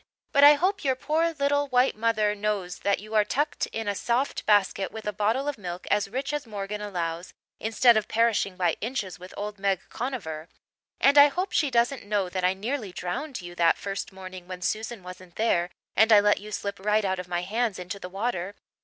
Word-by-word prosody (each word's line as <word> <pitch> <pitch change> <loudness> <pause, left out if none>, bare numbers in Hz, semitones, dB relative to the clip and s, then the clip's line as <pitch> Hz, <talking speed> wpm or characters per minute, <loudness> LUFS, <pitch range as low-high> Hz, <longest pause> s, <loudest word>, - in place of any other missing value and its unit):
But 280 - +4
I 295 +1 +10
hope 375 +7 0
your 265 -2 +2
poor 320 +5 0
little 285 -1 +1
white 255 0 +3
mother 215 -1 +1
knows 200 -3 -2
that 200 -1 0
you're 215 0 +1
tucked 295 +7 -1
in 225 -1 -5
a 205 - +1
soft 240 +7 -1
basket 195 -2 +2
with 220 -1 -8
a 210 - -2
bottle 220 +8 0
of 290 -6 -3
milk 180 -2 -6
as 205 -1 +2
rich 265 +6 -3
as 295 -4 -3
Morgan 210 0 -5
allows 175 -4 -4 0.2
instead 225 +2 +4
of 215 -1 +1
perishing 225 -4 +1
by 180 -2 +1
inches 210 -7 -3
with 185 +1 -11
old 205 0 -5
Meg 195 -2 +1
Conover. 185 - -5 0.5
And 285 +1 +6
I 285 - +10
hope 365 +6 -3
she 295 - +2
doesn't 240 +2 +1
know 205 -2 -1
that 185 0 -3
I 185 +1 +3
nearly 220 +1 -3
drowned 210 - -4
you 175 0 -8
that 170 -1 +3
first 200 0 -5
morning 185 -1 -10
when 180 -1 -7
Susan 220 0 -3
wasn't 180 -1 -11
there 175 -6 +1 0.3
and 220 +2 +5
I 210 - +9
let 205 0 +3
you 210 +1 -10
slip 200 -1 -4
right 210 +1 +1
out 190 -1 -1
of 180 - -6
my 175 0 -2
hands 220 +2 -1
into 180 +2 -6
the 180 - -7
water. 195 -1 -3
210 Hz, 210 wpm, -26 LUFS, 185-245 Hz, 0.5 s, I